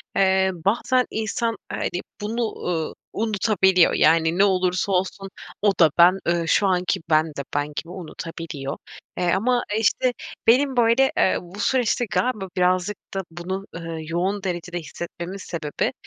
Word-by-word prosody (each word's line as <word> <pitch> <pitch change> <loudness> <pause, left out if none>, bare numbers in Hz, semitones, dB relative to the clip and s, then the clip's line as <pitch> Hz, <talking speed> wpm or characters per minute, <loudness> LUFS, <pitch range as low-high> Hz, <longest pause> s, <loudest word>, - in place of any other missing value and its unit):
eee, 190 0 +3
bazen 225 +8 +1
insan, 225 +1 -1 0.2
hani, 175 - -2 0.2
bunu, 225 +1 -3
ııı, 165 -3 -1 0.2
unutabiliyor. 195 -4 +3
Yani 165 +2 +3
ne 195 - +5
olursa 185 0 +1
olsun, 190 +1 -1 0.3
o 205 -1 +4
da 165 -3 +7
ben, 180 +3 +6
ııı, 170 -1 +1
şu 200 - +3
anki 180 -1 +1
ben 155 0 +4
de 145 -3 -6
ben 145 0 +1
gibi 165 - -5
unutabiliyor. 165 -5 -6 0.4
Eee, 175 -1 +1
ama, 240 +5 +1
işte, 245 +3 +2 0.3
benim 265 +2 +4
böyle, 240 +3 +4
eee, - - +3
bu 180 +4 -12
süreçte 245 0 +1
galiba 215 -7 0
birazcık 185 +2 +1 0.2
da 195 - -1
bunu, 185 +3 -5
ııı, 165 -1 -5
yoğun 180 +5 -2
derecede 175 -1 -3
hissetmemin 170 +3 -7
sebebi, 160 -5 -3
185 Hz, 145 wpm, -23 LUFS, 170-210 Hz, 0.4 s, da